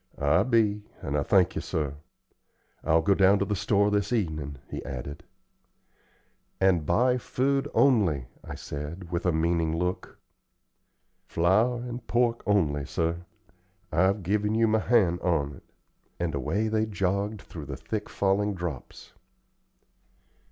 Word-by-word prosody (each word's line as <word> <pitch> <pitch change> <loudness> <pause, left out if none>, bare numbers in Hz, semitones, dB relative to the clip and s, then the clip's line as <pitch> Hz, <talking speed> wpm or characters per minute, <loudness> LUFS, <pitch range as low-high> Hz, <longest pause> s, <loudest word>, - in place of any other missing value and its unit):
"I 70 +4 +3
be, 110 -2 +2 0.2
and 70 - -2
I 75 - +2
thank 95 +2 +3
you, - - -3
sir. 75 -3 -2 0.9
I'll 80 0 +3
go 100 - +4
down 95 +1 +5
to 100 - 0
the 105 +1 -1
store 100 +1 +2
this 105 +1 0
evenin'," 80 - -2
he - - -6
added. 70 +3 -7 1.4
"And 90 -5 +2
buy 125 +8 +3
food 135 +3 0
only," 95 - +3 0.2
I - - -7
said, 80 +5 -7
with 85 +1 -1
a - - +4
meaning 80 0 0
look. 90 +2 -3 1.1
"Flour 110 +8 +2
and 120 -1 -7
pork 120 0 +1
only, 75 -9 +1
sir. 85 +2 -2 0.6
I've 95 +5 +2
given 105 +4 0
you 115 0 +3
my 110 0 +2
hand 100 -7 +2
on't;" 75 -6 -1 0.6
and 85 -3 -1
away 95 - -1
they 110 0 +1
all 110 - -10
jogged 100 +1 -1
through 80 -4 -9
the 70 -3 -5
thick 105 - -5
falling 100 +1 0
drops. 85 -7 -7
95 Hz, 140 wpm, -27 LUFS, 80-105 Hz, 1.4 s, down